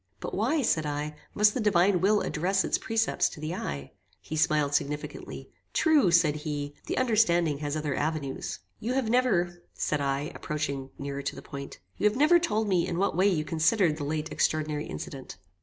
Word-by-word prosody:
"But - - -6
why," 265 +9 +1
said 160 -8 +2
I, 150 +1 -3 0.2
"must 210 0 +5
the - - -2
Divine 195 -4 +3
Will 205 +2 +3
address 190 +4 0
its - - 0
precepts 225 0 +1
to - - -11
the 155 +2 -3
eye?" 70 - -5 0.3
He 155 - -6
smiled 150 -2 +2
significantly. 150 0 -3 0.2
"True," 305 - +4
said 165 -3 +4
he, 145 -1 -4
"the - - -2
understanding 175 - +3
has 145 0 -2
other 150 -2 -2
avenues." 145 -2 -2 0.2
"You 235 +4 -2
have 255 -4 0
never," 180 -9 +2
said 150 -1 -1
I, 140 +1 -1
approaching 140 -3 -3
nearer 140 0 -4
to 140 - -3
the - - -9
point 140 0 -8 0.2
"you 210 - +4
have 210 - -5
never 310 +5 +6
told 220 -11 0
me 180 -4 +2
in 170 - -2
what 195 -1 +1
way 185 +3 +4
you 160 -6 +1
considered 165 +1 +2
the 150 - -4
late 155 +2 -3
extraordinary 155 -1 0
incident." 135 -2 -7
160 Hz, 190 wpm, -28 LUFS, 150-210 Hz, 0.3 s, never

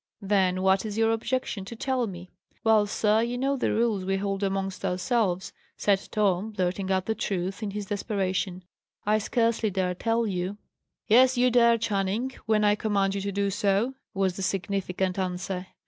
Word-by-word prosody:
"Then 190 -2 +2
what 190 0 +3
is 215 -1 -5
your 225 0 +3
objection 225 -2 -2
to 235 - -8
tell 255 0 -1
me?" 180 -2 -9 0.3
"Well, 220 -2 +4
sir, 210 +1 +2
you 240 +1 -1
know 275 +2 +1
the 265 - 0
rules 220 -4 +1
we 195 +1 0
hold 195 0 -2
amongst 195 -1 -2
ourselves," 185 0 0 0.2
said 195 -2 +1
Tom, 205 0 +1
blurting 190 0 -1
out 190 -1 +1
the 220 - 0
truth, 195 -1 -3
in 210 - -2
his 205 +1 -4
desperation. 190 -3 -2 0.4
"I 215 +1 +3
scarcely 230 0 +1
dare 185 -2 -1
tell 230 +5 0
you." 190 0 -2 0.5
"Yes, 255 +3 +5
you 250 0 +4
dare, 235 -1 +5
Channing, 215 +3 -1 0.2
when 215 -1 +3
I 205 0 +5
command 200 -2 0
you 200 - -2
to 200 +1 -2
do 200 0 0
so," 200 +6 +1 0.2
was 190 -2 0
the - - -4
significant 190 0 -1
answer. 185 0 -3
200 Hz, 180 wpm, -27 LUFS, 190-225 Hz, 0.5 s, Yes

